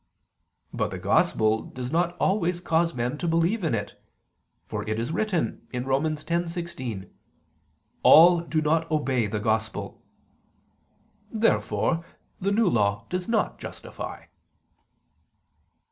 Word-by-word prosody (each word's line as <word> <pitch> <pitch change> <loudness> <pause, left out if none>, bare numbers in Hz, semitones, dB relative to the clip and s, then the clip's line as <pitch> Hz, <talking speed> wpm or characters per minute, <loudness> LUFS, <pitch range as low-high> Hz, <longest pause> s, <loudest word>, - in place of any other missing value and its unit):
But - - -1
the - - -5
Gospel 110 0 +2
does 125 0 -7
not 175 +1 0
always 180 -3 +1
cause 165 -1 +1
men 125 +4 -2
to 175 - -2
believe 170 +6 +1
in 155 -8 +1
it: 100 -1 -6 0.6
for - - -4
it 110 - -1
is 115 +5 -2
written 185 -1 -1
(Rom. 135 +3 0
10:16): 165 - -3 0.9
"All 175 +2 +8
do 165 -2 -1
not 160 +2 +1
obey 135 -7 +1
the 105 +1 -2
Gospel." 110 +1 -2 1.3
Therefore 215 -6 +1 0.4
the 200 +2 0
New 220 +1 +3
Law 100 - +1
does 180 0 -2
not 225 -2 0
justify. - - -8
160 Hz, 115 wpm, -26 LUFS, 120-175 Hz, 1.3 s, All